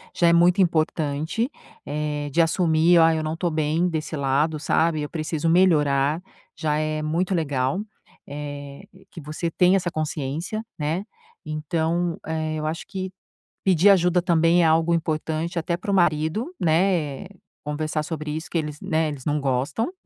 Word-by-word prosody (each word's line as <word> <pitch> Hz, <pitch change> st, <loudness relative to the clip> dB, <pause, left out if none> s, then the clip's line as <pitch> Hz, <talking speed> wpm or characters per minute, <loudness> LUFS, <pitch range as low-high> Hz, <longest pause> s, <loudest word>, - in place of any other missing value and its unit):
já 170 Hz, -, +3 dB
é 170 Hz, -, +5 dB
muito 175 Hz, +3 st, +5 dB
importante, 160 Hz, -, 0 dB, 0.4 s
eh, 150 Hz, 0 st, -3 dB
de 165 Hz, -, -1 dB
assumir: 165 Hz, 0 st, +3 dB
"Ah, 165 Hz, 0 st, +5 dB
eu 160 Hz, -, -2 dB
não 155 Hz, 0 st, -2 dB
estou 170 Hz, +2 st, -1 dB
bem 155 Hz, +2 st, +1 dB
desse 160 Hz, -1 st, -3 dB
lado, 145 Hz, +3 st, 0 dB
sabe. 160 Hz, +1 st, +1 dB
Eu 150 Hz, -, -4 dB
preciso 160 Hz, 0 st, -2 dB
melhorar.", 150 Hz, -4 st, +3 dB, 0.3 s
já 150 Hz, -2 st, -1 dB
é 155 Hz, 0 st, -1 dB
muito 170 Hz, +5 st, -1 dB
legal, 140 Hz, -2 st, 0 dB, 0.5 s
eh, 145 Hz, -1 st, -7 dB, 0.3 s
que -, -, -10 dB
você 155 Hz, +3 st, -3 dB
tenha 180 Hz, +3 st, +3 dB
essa 175 Hz, -2 st, -2 dB
consciência, 155 Hz, +6 st, -3 dB
né. 160 Hz, +5 st, -1 dB, 0.4 s
Então, 160 Hz, +3 st, -1 dB
eh, 155 Hz, -1 st, -2 dB
eu 155 Hz, -, -3 dB
acho 160 Hz, +2 st, -4 dB
que 190 Hz, -1 st, -5 dB, 0.5 s
pedir 190 Hz, +1 st, +5 dB
ajuda 180 Hz, -2 st, +4 dB
também 170 Hz, 0 st, +3 dB
é -, -, +5 dB
algo 160 Hz, +1 st, +3 dB
importante 160 Hz, +1 st, -2 dB
até 170 Hz, +1 st, -1 dB
para 185 Hz, -, -5 dB
o -, -, +3 dB
marido, 170 Hz, -, +1 dB
né. 165 Hz, -2 st, +1 dB, 0.4 s
Conversar 155 Hz, +1 st, -2 dB
sobre 155 Hz, -1 st, -5 dB
isso 160 Hz, -, -5 dB
que -, -, -4 dB
eles, 150 Hz, -2 st, -4 dB
né, 160 Hz, -4 st, 0 dB
eles 145 Hz, -4 st, -7 dB
não 150 Hz, 0 st, 0 dB
gostam. 140 Hz, -, -1 dB
160 Hz, 160 wpm, -24 LUFS, 150-170 Hz, 0.5 s, é